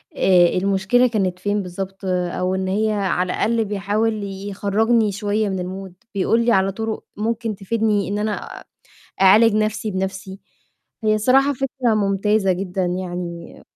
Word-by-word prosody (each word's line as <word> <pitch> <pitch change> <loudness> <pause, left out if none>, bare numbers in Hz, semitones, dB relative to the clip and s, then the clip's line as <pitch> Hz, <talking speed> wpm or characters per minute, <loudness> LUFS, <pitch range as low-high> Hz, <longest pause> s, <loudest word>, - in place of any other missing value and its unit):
آآ، 180 -2 +5
المشكلة 195 +6 +2
كانت 190 -6 -1
فين 205 +1 -1
بالضبط 190 +2 -7
أو 180 0 -1
إن 190 0 -2
هي 215 +3 +1
على 185 -3 0
الأقل 230 0 +1
بيحاول 210 +2 -1
يخرجني 205 +3 0
شوية 205 +1 -1
من 190 - -2 0.3
الmood، - - -20 0.2
بيقول 225 +4 +2
لي 240 - +3
على 195 -2 +3
طرق 220 +2 -4
ممكن 225 0 -2
تفيدني 210 0 0
إن 205 +1 -2
أنا 210 0 -4 0.6
أعالج 210 +3 +6
نَفْسي 215 0 -1
بنَفْسي. 190 0 -4 0.6
هي 215 0 +3
الصراحة 260 +6 +3
فكرة 255 -3 -1
ممتازة 200 -1 +1
جدًا 185 0 -2
يعني. 175 -1 -5
200 Hz, 140 wpm, -21 LUFS, 190-220 Hz, 0.6 s, أعالج